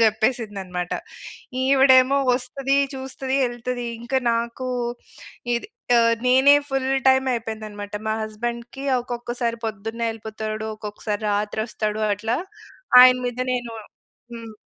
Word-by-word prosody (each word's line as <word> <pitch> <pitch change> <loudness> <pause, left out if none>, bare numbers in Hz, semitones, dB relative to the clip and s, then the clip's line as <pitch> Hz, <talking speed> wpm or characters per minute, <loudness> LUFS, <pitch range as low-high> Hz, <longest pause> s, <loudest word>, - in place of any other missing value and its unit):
చెప్పేసింది 220 -1 0
అనమాట. 180 -1 -4 0.7
ఈవిడేమో 265 0 +5 0.2
వస్తది, 270 +2 -1 0.2
చూస్తది, 265 0 -4
యెళ్తది. 245 0 -3 0.2
ఇంక 240 +3 -11 0.2
నాకూ 235 +2 -2 0.9
ఇద్ - - -5 0.3
ఆహ్, 230 0 +4
నేనే 265 +3 +6
ఫుల్ 270 -1 -1 0.2
టైమ్ 265 0 +4
అయిపోయిందనమాట. 215 -3 -6 0.2
మా 215 - +1
హస్బెం‌డ్‌కి 235 +4 -5 0.2
ఒక్కొక్కసారి 240 -1 -3
పొద్దున్నే 225 +2 -4
యెళ్ళిపోతాడు. 220 0 -5
ఒక్కొక్కసారి 210 0 -5
రాత్రొస్తాడు. 215 +1 -2
అట్లా 220 +4 -2 0.6
ఆయన 255 0 +8
మీద 245 0 -4
నేను 240 -2 -3 0.6
హ్మ్. 225 -2 -9
235 Hz, 105 wpm, -23 LUFS, 215-255 Hz, 0.9 s, ఆయన